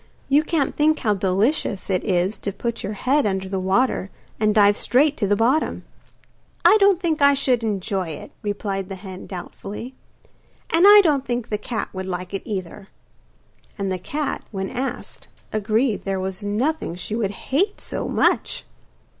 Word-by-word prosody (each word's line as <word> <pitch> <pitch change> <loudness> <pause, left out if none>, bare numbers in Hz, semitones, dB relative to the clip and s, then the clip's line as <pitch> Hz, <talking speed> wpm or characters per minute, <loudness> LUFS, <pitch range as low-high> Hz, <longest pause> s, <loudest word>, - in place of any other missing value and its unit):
You 285 +2 +5
can't 315 -4 0
think 310 +1 +3
how 210 -3 +1
delicious 200 +3 0
it 185 -2 0
is 185 +1 0
to 200 - -3
put 235 +4 -4
your 205 - -4
head 260 +4 +1
under 190 -1 -2
the 190 0 -2
water 195 +2 +1 0.3
and 215 0 +2
dive 205 -1 +6
straight 285 +7 +2
to 205 - 0
the 205 - +3
bottom.' 250 +9 +1 0.8
'I 385 +5 +8
don't 395 -3 +5
think 325 -4 -1
I 280 0 +6
should 255 -4 +1
enjoy 195 -3 -1
it,' 155 -2 -8
replied 200 -2 -3
the 195 - -5
hen 185 -1 -9
doubtfully. 200 +6 -7 0.8
'And 340 +4 +6
I 415 0 +10
don't 290 -6 +2
think 240 -3 -3
the 210 - 0
cat 220 +2 -4
would 190 0 -5
like 180 0 -5
it 195 - -2
either.' 195 -1 -5 0.9
And 195 -2 -2
the 185 - -2
cat, 290 - -3
when 195 -2 -4
asked, 260 +1 -5 0.3
agreed 215 +2 +1
there 195 -1 -2
was 190 +1 -4
nothing 210 - -1
she 185 +4 -4
would 220 -4 0 0.2
hate 390 +10 +1
so - - -4
much. - - +1
210 Hz, 170 wpm, -22 LUFS, 190-275 Hz, 0.9 s, I